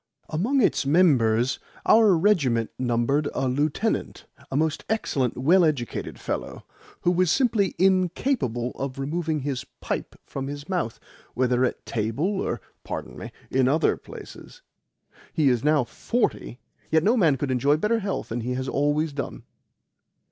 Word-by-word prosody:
Among 230 - +1
its - - +2
members 135 -7 +3 0.3
our 215 -5 +6
regiment 145 - +2
numbered 130 +4 +1
a 135 - 0
lieutenant 150 - -1 0.2
a 135 - -1
most 155 0 0
excellent, 140 - 0
well 170 +9 +4
educated 145 -7 -2
fellow - - -5 0.4
who 175 - +3
was 180 -1 +2
simply 225 - +2
INCAPABLE 185 - +1
of 135 -1 -4
removing 155 +2 -2
his 135 -2 -3 0.2
pipe - - -4
from 135 0 -5
his 145 +1 -7
mouth, 180 -12 -2 0.4
whether 125 0 +2
at - - -4
table 130 - -1
or - - -2 0.2
(pardon - - -6
me) - - -8 0.2
in 130 -1 +3
other 155 +5 +3
places. - - -12 0.7
He 155 -5 +3
is 120 -2 +1
now 150 -2 +3
forty, 175 - -2 0.3
yet 160 0 +3
no 220 +6 +4
man 165 - +3
could 135 +1 -2
enjoy 140 +4 +3
better 220 +7 +1
health 200 -2 -3
than 120 +2 -3
he 125 +2 -2
has 130 +1 -3
always 145 +3 0
done." 140 -1 -5
145 Hz, 150 wpm, -25 LUFS, 130-185 Hz, 0.7 s, our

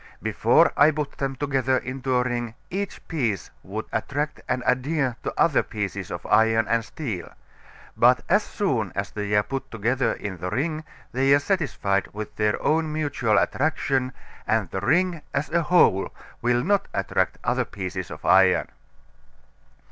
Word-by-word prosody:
Before - - +3
I 145 +2 +6
put 150 -2 -2
them 135 -1 -1
together 130 -1 +1
into 130 0 -2
a 125 - +3
ring 120 -2 -3 0.2
each 200 +1 -4
piece 115 - -2
would 105 +3 -5
attract 145 +7 -2
and 125 - 0
adhere 130 0 +1
to - - -3
other 155 -5 +4
pieces 100 -4 -4
of - - -6
iron 110 0 +3
or 115 +2 +2
steel. 110 - -5 0.7
But 125 +2 +5
as 205 +4 +4
soon 130 - -1
as 100 0 -3
they 105 0 -2
are 105 - +4
put 135 +5 -5
together 120 +4 0
in 100 -3 -6
the 90 +2 -4
ring 155 - -2 0.3
they 135 +2 +2
are - - +3
satisfied 140 - 0
with 105 0 -6
their 105 0 +1
own 160 0 +1
mutual 145 -8 0
attraction, 135 -2 +1 0.4
and 110 -6 +1
the 95 - -3
ring 175 - +2
as 140 +2 -1
a 170 +1 +3
whole 155 - +4 0.3
will 120 0 +2
not 200 +2 +1
attract - - 0
other - - +1
pieces 95 -2 -5
of 75 0 -9
iron. 95 0 +5
125 Hz, 160 wpm, -24 LUFS, 105-150 Hz, 0.7 s, I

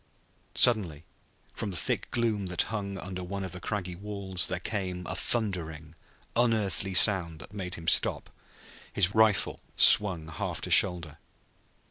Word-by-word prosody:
Suddenly, 90 -11 +1 0.5
from 105 - -6
the 90 - -1
thick - - -1
gloom 110 -5 -2
that 90 -1 -2
hung 100 -2 -5
under 90 -1 -8
one 100 +2 -6
of 95 - -7
the 90 - -9
cragged 90 -2 -6
walls, 100 -3 -3
there 90 - -4
came 90 -3 -5
a 95 - -6
thundering, 85 -8 0 0.4
unearthly 105 -5 +2
sound 85 -4 +3
that 75 +7 -13
made 95 -3 -6
him 85 0 -11
stop, - - +1 0.6
his 90 +3 +1
rifle 110 -2 +1 0.2
swung 90 -7 +5
half 80 -1 -6
to - - -6
shoulder. 85 -5 +3
95 Hz, 145 wpm, -27 LUFS, 85-105 Hz, 0.6 s, swung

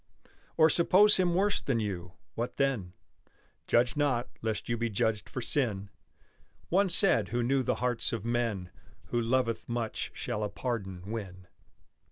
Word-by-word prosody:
Or 160 - +7
suppose 195 +6 +6
him 180 -2 +2
worse 200 +2 +1
than 125 -4 0
you; 90 -5 -4 0.2
what 120 +2 -4
then? 120 -10 -1 0.7
Judge 120 +1 +2
not, 135 -5 0
lest 110 -1 -3
you 115 - 0
be 115 0 -2
judged 105 +1 -1
for 130 - -5
sin! 105 -7 -1 0.8
One 195 +2 +3
said 170 - +4
who 120 +1 -1
knew 135 +3 +2
the - - 0
hearts 120 -2 0
of 115 -2 -4
men: 115 -7 -1 0.4
Who 120 - 0
loveth 115 -1 0
much 120 -2 -3
shall 115 -4 -3
a 105 - -2
pardon 95 -8 -4
win. 95 -4 -6
120 Hz, 155 wpm, -30 LUFS, 105-135 Hz, 0.8 s, Or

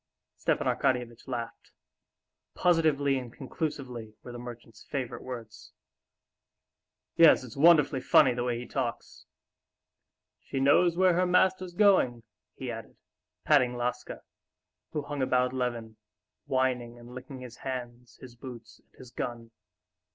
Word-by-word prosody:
'" - - -60
Stepan - - +1
Arkadyevitch 120 -2 -1
laughed. 120 -3 -6 0.8
"Positively 150 -6 +2
and 125 -2 -9
conclusively" 125 -5 -5
were 125 - -9
the 120 - -8
merchant's 120 -2 -10
favorite 130 -4 -4
words. 115 -4 -9 1.4
"Yes, 165 -5 +7
it's 120 -3 -10
wonderfully 150 -3 +5
funny 130 0 +5
the 120 0 -2
way 120 -1 -1
he 120 - -6
talks. 125 -5 -4 1.1
She 135 - -5
knows 165 +6 +4
where 185 -1 +5
her 180 +1 +2
master's 185 0 +2
going!" 185 - +4 0.3
he 130 -2 -5
added, 115 -1 -9 0.5
patting 125 -5 +3
Laska, 125 +1 -4 0.7
who 150 - -3
hung 145 -1 -4
about 125 0 +2
Levin, 120 -3 -3 0.5
whining 125 -2 -1
and 120 +1 -13
licking 130 +1 -9
his 125 -2 -10
hands, 125 -2 -7
his 125 -2 -12
boots, 120 -1 -11
and - - -32
his 125 -2 -13
gun. 120 -2 -5
125 Hz, 130 wpm, -29 LUFS, 120-140 Hz, 1.4 s, Yes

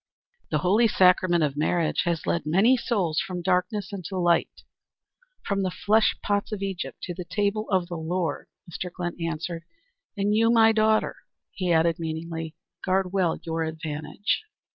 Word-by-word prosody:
"The - - +1
holy 215 +6 +4
sacrament 180 -4 +4
of 145 -2 0
marriage 160 +3 +1
has 170 -2 -1
led 170 - 0
many 195 +11 +4
souls 195 -10 0
from 180 -2 -4
darkness 185 +3 0
into 190 0 -5
light, 175 -1 +1 0.8
from 200 -1 0
the 190 - 0
flesh 215 +4 +2
pots 205 +1 0
of 205 -2 -3
Egypt 195 -2 -5
to 175 - -4
the 180 - -6
table 205 +3 -1
of 185 -3 +1
the 175 -1 -5
Lord" 165 -1 -2 0.2
Mr. 180 +1 -5
Glynn 175 -1 -4
answered. 165 +1 -3 0.6
"And 200 +1 +1
you, 225 +1 +4
my 225 -1 +6
daughter," 220 0 +2 0.3
he 185 -2 -2
added, 165 0 +3
meaningly, 165 0 -5 0.3
"guard 190 0 0
well 185 -4 +1
your 165 0 -2
advantage." 160 - -3
180 Hz, 160 wpm, -26 LUFS, 165-200 Hz, 0.8 s, my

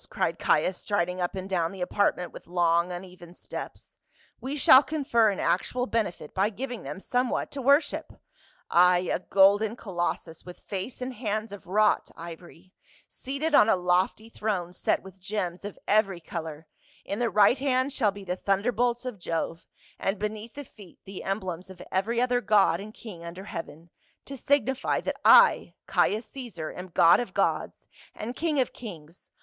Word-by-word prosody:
cried - - -1
Caius, 180 +4 +2
striding 180 -2 -1
up 175 - -2
and 190 0 -5
down 175 -3 0
the 195 -2 -9
apartment 180 -1 0
with - - -12
long 170 0 +2
uneven 180 -1 -9
steps. - - -9 0.2
" - - -33
We 275 +3 -4
shall 260 -1 +8
confer 270 -8 +2
an 195 - -3
actual 250 +7 0
benefit 215 -11 -3
by 195 +2 +2
giving 245 +2 -6
them 145 +6 -7
somewhat 250 +4 -1
to 280 - -5
worship. 280 +4 +2 0.6
Ay, 180 0 +4
a - - 0
golden 200 +4 +4
colossus 175 -5 -4
with 180 -1 -11
face 200 +6 -6
and 255 +1 -4
hands 215 -2 -3
of 205 -3 -10
wrought 210 +3 +2
ivory, 170 +2 -11 0.3
seated 280 +4 -4
on 225 - +6
a - - +5
lofty 180 +4 0
throne 200 -6 -3
set - - 0
with 190 0 -13
gems 185 -2 -3
of 205 - -7
every 200 -4 +2
color, 160 -2 -7 0.4
in 200 - -4
the 240 -1 +1
right 210 +5 +4
hand 260 0 +1
shall 225 -7 +2
be 200 0 -7
the 180 -1 -3
thunderbolts 235 +5 0
of 245 -6 -5
Jove 165 -1 -3 0.3
and 195 +2 -1
beneath 215 +2 -5
the 285 0 -7
feet 200 -7 -16
the 195 -1 -8
emblems 190 -2 -4
of 190 -2 -12
every 220 +5 0
other 245 0 +2
god 195 -6 +3
and 210 +2 -8
king 185 -8 -10
under 170 +3 -8
heaven, 165 -3 -8 0.3
to 275 - -7
signify 265 0 +1
that - - -4
I, 480 0 +6
Caius 215 +3 +1
Caesar, 215 - -6
am 180 +1 -8
god 170 -1 +5
of 245 - -5
gods, - - -1 0.3
and 235 +4 -6
king 310 -3 0
of 255 - 0
kings. 170 -7 -11
200 Hz, 175 wpm, -27 LUFS, 180-235 Hz, 0.6 s, shall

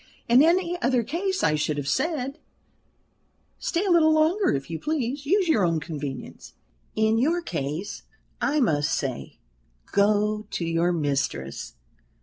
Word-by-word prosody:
"In 240 +3 +6
any 350 +2 +2
other 245 -1 +2
case 370 - -2
I 155 - +3
should 150 0 -1
have 140 -2 -3
said, 280 - -1 1.2
'Stay 355 +4 -1
a 385 - +1
little 320 -2 +5
longer, 320 +6 +3
if 135 0 -2
you 165 -1 -5
please. 280 -2 -2
Use 380 +2 +3
your 230 - +3
own 165 -2 +2
convenience.' 150 -3 -7 0.4
In 220 +1 +2
your 320 +8 +2
case 150 - -4 0.4
I 300 +2 +1
must 150 - +1
say, 130 -4 -4 0.5
'Go 210 +1 +2
to 170 - -3
your 165 +1 +1
mistress.' 140 - -2
220 Hz, 140 wpm, -25 LUFS, -, 1.2 s, In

